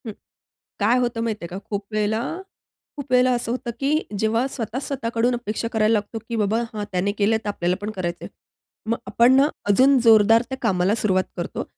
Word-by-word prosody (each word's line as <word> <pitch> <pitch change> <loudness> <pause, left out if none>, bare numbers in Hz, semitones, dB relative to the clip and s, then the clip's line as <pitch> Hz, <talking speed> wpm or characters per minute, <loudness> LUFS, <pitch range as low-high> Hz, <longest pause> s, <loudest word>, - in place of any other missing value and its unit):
हं. - - -3 0.7
काय 225 +4 +3
होतं 240 -2 -1
माहिती 220 -5 -3
आहे - - -6
का? 185 - -6
खूप 205 -1 -3
वेळेला 215 +1 0 0.8
खूप 285 -2 -7
वेळेला 250 0 +4
असं 240 -1 -2
होतं, 240 -1 -3
की 275 +1 0 0.3
जेव्हा 225 +4 +1
स्वतः 235 0 -4
स्वतःकडून 245 -3 -1
अपेक्षा 230 -1 -3
करायला 220 0 +3
लागतो, 215 +1 -2
की 235 - -2
बाबा 215 +1 +1
हां, 210 -1 -4
त्याने 185 +2 0
केलं 215 +2 +3
तर 210 - -3
आपल्याला 180 -3 -1
पण 210 +1 -4
करायचं 175 -4 -4
आहे. - - -9 0.6
मग 230 - +1
आपण 240 +2 +4
ना 275 +2 +5 0.2
अजून 265 +7 +5
जोरदार 225 0 +6
त्या 265 - -4
कामाला 195 -2 +1
सुरुवात 190 -4 +1
करतो. - - -4
225 Hz, 195 wpm, -22 LUFS, 205-240 Hz, 0.8 s, जोरदार